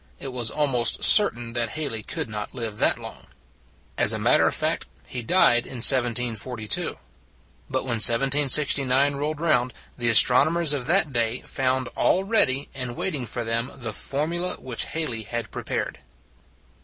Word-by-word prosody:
It 135 -1 -7
was 120 -3 0
almost 135 -5 -1
certain 120 - +2
that 120 -2 -2
Halley 145 -8 -5
could - - -5
not 105 -1 -7
live 110 -3 -5
that - - +2
long. - - -11 0.7
As - - +3
a - - -2
matter - - +2
of - - -1
fact, - - -3 0.2
he 120 - -6
died 120 -3 +2
in - - -7
1742. 120 -2 +3 0.7
But 130 0 -2
when 120 -4 -1
1769 135 +2 +3
rolled 150 +2 -4
round, 130 -7 0 0.3
the 120 -1 +1
as 115 - +9
tronomers 155 +5 +1
of 135 -3 -4
that 170 -4 +1
day 115 0 -1
found 130 -1 -2
all 190 - 0
ready 145 - +2
and 125 -3 -5
waiting 140 -8 -4
for 120 +2 -5
them 115 +3 -3
the 115 -4 -6
formulas 170 - -2
which 125 -3 -3
Hal 160 0 -4
ley 115 -2 -4
had 115 +2 -6
prepared. - - -5
130 Hz, 160 wpm, -23 LUFS, 115-145 Hz, 0.7 s, as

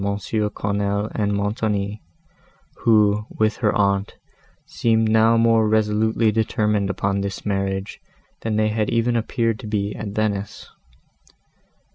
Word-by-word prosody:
Quesnel 100 0 -2
and 105 -2 0
Montoni, 100 0 -2 0.8
who, 105 -2 +3
with 110 0 0
her 105 -4 +1
aunt, 100 0 0 0.5
seemed 110 -1 +1
now 110 +1 +4
more 115 -1 +3
resolutely 110 +1 +2
determined 105 -2 0
upon 100 0 -1
this 100 -1 -5
marriage 95 -1 -2 0.4
than 110 -1 -2
they 110 0 +2
had 110 +1 -1
even 120 0 +1
appeared 115 -1 -1
to - - -8
be 105 -1 -2
at 105 - -6
Venice. 105 0 -3
105 Hz, 120 wpm, -22 LUFS, 100-110 Hz, 0.8 s, now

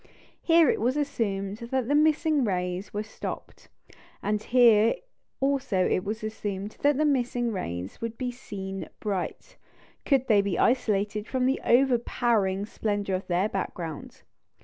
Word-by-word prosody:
Here 330 -2 +5
it - - +1
was 250 +5 +1
assumed 205 -9 -2
that 240 +1 -2
the 285 - +1
missing 305 -1 +3
rays 180 -2 -2
were 210 +1 -3
stopped, 215 - -8 0.5
and 210 0 0
here 230 -2 +5 0.4
also 270 -9 +1
it 185 - 0
was 215 +2 -4
assumed 205 -2 -4
that 290 -1 +3
the 305 - +2
missing 245 -4 +1
rays 90 - -5
would 230 0 -4
be 250 -1 -2
seen 195 -6 -7
bright, 200 -4 -4 0.5
could 265 -3 +2
they 210 -3 +5
be 200 -3 -2
isolated 210 -3 +1
from 255 -1 0
the 265 +2 +1
overpowering 235 -5 +2
splendour 205 -3 -2
of 185 - -5
their 180 +3 +1
background. 170 -6 -5
220 Hz, 145 wpm, -27 LUFS, 195-255 Hz, 0.5 s, Here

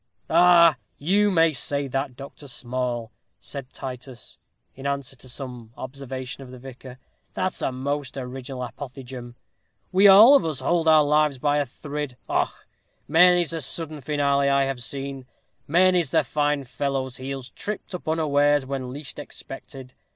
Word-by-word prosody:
"Ah! 170 -1 +7 0.2
you 200 +7 +3
may 165 -4 +4
say 140 0 -2
that, 135 0 -3
Dr. 140 +2 -11
Small," 125 -2 -3 0.3
said 135 -2 -9
Titus, 130 -1 -8 0.3
in 135 +1 -6
answer 140 -1 -3
to 130 - -14
some 125 -3 -8
observation 130 0 -6
of 130 - -10
the 130 - -10
vicar, 130 0 -11 0.4
"that's 185 - -2
a - - 0
most 140 +1 -3
original 130 0 -6
apothegm. 125 -2 -8 0.6
We 195 +2 +6
all 215 +8 +9
of 280 - +4
us 155 -4 -2
hould 170 -2 +1
our 155 -1 +7
lives 150 -1 +2
by 145 +3 +1
a 145 - -1
thrid. 145 0 -6
Och! - - -1 0.4
many's 175 +1 +5
the 165 -1 -3
sudden 155 +1 -4
finale 140 0 +1
I 140 0 +3
have 135 -2 -3
seen. 135 0 -5 0.4
Many's 175 -1 +4
the 160 +1 +3
fine 145 0 0
fellow's 130 0 -3
heels 135 -1 -6
tripped 210 -2 -6
up 180 - -7
unawares, 145 -3 +2
when 130 -1 -4
least 135 -3 -8
expected. 130 -1 -10
140 Hz, 150 wpm, -24 LUFS, 130-155 Hz, 0.6 s, all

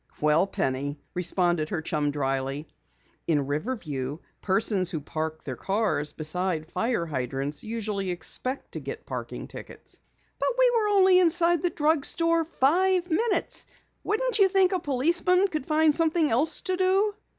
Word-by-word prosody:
"Well, 150 +5 +3
Penny," 140 -1 -2
responded 175 -2 0
her 160 -3 -3
chum 150 -2 -1
dryly, 135 +1 -2 0.6
"in 145 -4 +1
Riverview 145 - -3 0.2
persons 195 -2 +1
who 160 - -3
park 155 +1 -5
their 130 - -5
cars 195 - -1
beside 160 +1 -1
fire 230 -7 -1
hydrants 135 0 -3
usually 215 -4 -3
expect 255 +9 -3
to - - -5
get - - -7
parking - - -6
tickets." - - -10 0.4
"But - - +1
we - - +5
were 435 -2 +2
only 380 -3 +5
inside 345 -1 +3
the 355 - +1
drugstore 330 +2 +2
five 355 +4 +1
minutes. 440 +6 0 0.4
Wouldn't 455 +1 0
you 395 - +7
think 380 -1 +3
a 370 - 0
policeman 340 +7 +2
could 310 -6 -4
find 310 0 +3
something 320 0 +1
else 270 +8 +1
to 370 -1 -2
do?" 385 +3 +2
230 Hz, 145 wpm, -26 LUFS, -, 0.6 s, you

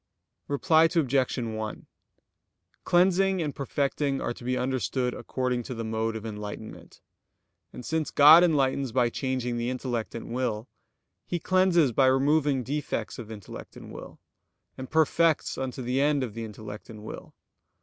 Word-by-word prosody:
Reply 160 +3 +4
Obj. 140 -7 +1
1: 110 -3 -4 1.0
Cleansing 190 +2 +3
and 150 -2 -3
perfecting 140 0 -1
are - - -2
to 120 - -13
be 125 +1 -1
understood 130 -1 -1
according 125 -1 -2
to 125 +1 -7
the 115 - -4
mode 110 0 -2
of 110 0 -6
enlightenment. 105 0 -8 0.7
And 125 - -9
since 160 -1 -1
God 155 +4 +8
enlightens 140 -5 +1
by 120 -1 +2
changing 130 -2 -2
the 120 +1 -1
intellect 125 -3 -3
and 115 0 -6
will, 120 -2 -2 0.6
He 175 - -1
cleanses 180 -5 +3
by 130 +3 +3
removing 140 0 +2
defects 130 -4 -3
of 110 -3 -8
intellect 105 -4 -10
and - - -11
will, - - -10 0.6
and 130 0 -8
perfects 160 0 +2
unto 130 0 -4
the 125 +3 0
end 145 -1 +2
of 115 -5 -5
the 115 0 -5
intellect 105 0 -9
and 105 -2 -10
will. - - -9
130 Hz, 150 wpm, -27 LUFS, 115-150 Hz, 1.0 s, God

